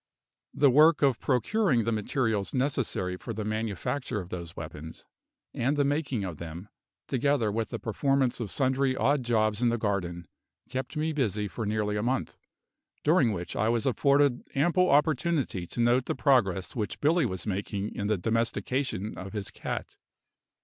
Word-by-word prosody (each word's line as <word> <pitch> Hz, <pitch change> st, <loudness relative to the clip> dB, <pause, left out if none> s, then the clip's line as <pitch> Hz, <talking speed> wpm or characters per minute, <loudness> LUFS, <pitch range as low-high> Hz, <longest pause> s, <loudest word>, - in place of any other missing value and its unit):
The 140 Hz, -2 st, +5 dB
work 150 Hz, +3 st, +5 dB
of 135 Hz, -4 st, +3 dB
procuring 140 Hz, -, +2 dB
the 115 Hz, -, 0 dB
materials 110 Hz, -1 st, -1 dB
necessary 125 Hz, -9 st, -1 dB
for 115 Hz, -, -6 dB
the 110 Hz, 0 st, -3 dB
manufacture 110 Hz, +3 st, -2 dB
of 90 Hz, -2 st, -7 dB
those 85 Hz, -2 st, -6 dB
weapons, 80 Hz, 0 st, -8 dB, 0.5 s
and 135 Hz, +5 st, 0 dB
the 145 Hz, -, +3 dB
making 140 Hz, -6 st, -1 dB
of 90 Hz, -5 st, -5 dB
them, 85 Hz, +5 st, -8 dB, 0.4 s
together 130 Hz, -4 st, +1 dB
with 110 Hz, 0 st, -2 dB
the -, -, -4 dB
performance 135 Hz, +2 st, 0 dB
of 115 Hz, -4 st, -3 dB
sundry 130 Hz, +1 st, +1 dB
odd 140 Hz, +1 st, +2 dB
jobs 110 Hz, -2 st, +1 dB
in 120 Hz, -, +4 dB
the 120 Hz, -, 0 dB
garden, 90 Hz, -6 st, -2 dB, 0.4 s
kept 130 Hz, +3 st, -4 dB
me 155 Hz, +1 st, 0 dB
busy 105 Hz, -7 st, 0 dB
for 110 Hz, +2 st, -4 dB
nearly 105 Hz, -1 st, 0 dB
a -, -, 0 dB
month, 130 Hz, +4 st, -1 dB, 0.7 s
during 145 Hz, -7 st, +4 dB
which 90 Hz, -4 st, -5 dB
I 110 Hz, -, +1 dB
was 115 Hz, -1 st, +1 dB
afforded 140 Hz, 0 st, +3 dB
ample 175 Hz, +6 st, +3 dB
opportunity 145 Hz, -, +1 dB
to -, -, -7 dB
note 120 Hz, +2 st, +3 dB
the -, -, -2 dB
progress 115 Hz, -8 st, +2 dB
which 105 Hz, -4 st, -3 dB
Billy 155 Hz, -1 st, +3 dB
was 95 Hz, -4 st, -4 dB
making 100 Hz, 0 st, -3 dB
in 100 Hz, -, -3 dB
the 105 Hz, -1 st, +1 dB
domestication 115 Hz, +1 st, -1 dB
of 95 Hz, +2 st, -7 dB
his 105 Hz, -3 st, -4 dB
cat. -, -, -5 dB
115 Hz, 165 wpm, -28 LUFS, 105-140 Hz, 0.7 s, The